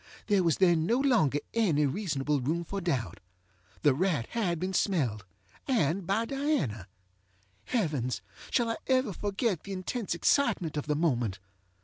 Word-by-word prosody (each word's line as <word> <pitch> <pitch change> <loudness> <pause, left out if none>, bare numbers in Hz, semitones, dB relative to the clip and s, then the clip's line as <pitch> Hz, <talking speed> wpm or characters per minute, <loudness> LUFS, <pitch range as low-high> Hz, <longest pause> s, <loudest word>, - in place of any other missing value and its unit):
There 205 -3 +3
was 165 -4 +2
then 170 -4 +3
no 235 - +3
longer 235 - +3 0.2
any 170 -11 +2
reasonable 145 -3 -1
room 160 +7 -1
for 195 +4 -4
doubt. 125 - -2 0.6
The 145 -3 +5
rat 160 -5 0
had 180 -8 0
been 185 +2 -2
smelledŌĆöand 160 - -1
by 220 +4 +1
Diana. 230 - -1 0.8
Heavens! 150 - -1 0.3
shall 235 -2 +1
I - - -3
ever 255 -5 +2
forget 200 - -1
the 200 - -6
intense 190 +2 -3
excitement 190 - +2
of 150 0 -3
the 150 - +1
moment? 120 - 0
170 Hz, 140 wpm, -29 LUFS, 145-215 Hz, 0.8 s, The